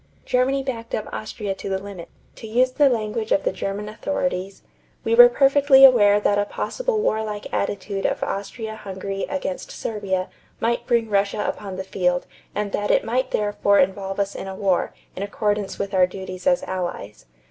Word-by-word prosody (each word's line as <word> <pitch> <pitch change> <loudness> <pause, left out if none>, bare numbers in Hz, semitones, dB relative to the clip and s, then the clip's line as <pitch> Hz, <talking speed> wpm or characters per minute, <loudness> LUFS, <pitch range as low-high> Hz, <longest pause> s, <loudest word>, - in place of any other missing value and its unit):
Germany 265 +2 +1
backed 230 -4 -4
up 215 - -4
Austria 210 -2 -4
to 195 - -7
the 190 - 0
limit. 190 -3 -9 0.3
To 225 - -8
use 250 +4 +2
the 285 +1 +4
language 220 -2 -2
of 195 - +3
the - - +1
German 195 +2 -4
authorities: 210 -4 -3 0.4
"We - - 0
were 485 +1 +10
perfectly 275 - +6
aware 205 -6 +6
that 205 0 +2
a 205 - +1
possible - - -2
warlike 215 - -2
attitude 200 0 -1
of - - -2
Austria 220 +2 -4
Hungary 195 -1 -5
against 280 -10 -4
Serbia 195 -4 -3 0.3
might 235 +1 -1
bring 235 -2 +2
Russia 200 0 0
upon 195 -2 -4
the 190 - -4
field 180 -2 0 0.3
and 205 -1 -2
that 205 +1 -1
it - - +3
might 255 +3 0
therefore 205 -1 +2
involve 195 +1 0
us 200 0 0
in - - -6
a 190 - -6
war, 190 -2 +1 0.2
in - - -6
accordance 205 0 -1
with 200 0 -4
our 185 -1 +5
duties 185 +1 -7
as 265 -1 +3
allies. 175 - -5
205 Hz, 180 wpm, -23 LUFS, 195-235 Hz, 0.4 s, were